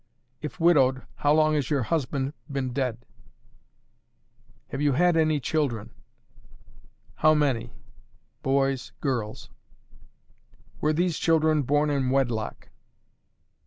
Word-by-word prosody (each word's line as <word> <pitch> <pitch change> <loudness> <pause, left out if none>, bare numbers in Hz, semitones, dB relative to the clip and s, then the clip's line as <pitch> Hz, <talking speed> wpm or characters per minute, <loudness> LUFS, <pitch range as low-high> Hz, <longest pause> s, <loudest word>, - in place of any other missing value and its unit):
"If 150 +3 -7
widowed, 135 -7 +4
how 145 - +2
long 155 0 +3
has 145 -3 0
your 140 -4 +1
husband 140 -1 -2 0.2
been 130 -3 -2
dead? 120 -3 -2 1.6
"Have 135 - -4
you 145 -1 +2
had 175 +5 +3
any 155 -2 +2
children? 135 -7 -2 1.3
"How 155 0 +4
many? 140 -6 0 0.7
Boys 135 -1 0
Girls 120 -7 -3 1.3
"Were 155 - +1
these 170 +1 0
children 160 -2 +3
born 145 +3 +1
in 135 -3 0
wedlock? 120 - -1
140 Hz, 105 wpm, -26 LUFS, 130-155 Hz, 1.6 s, widowed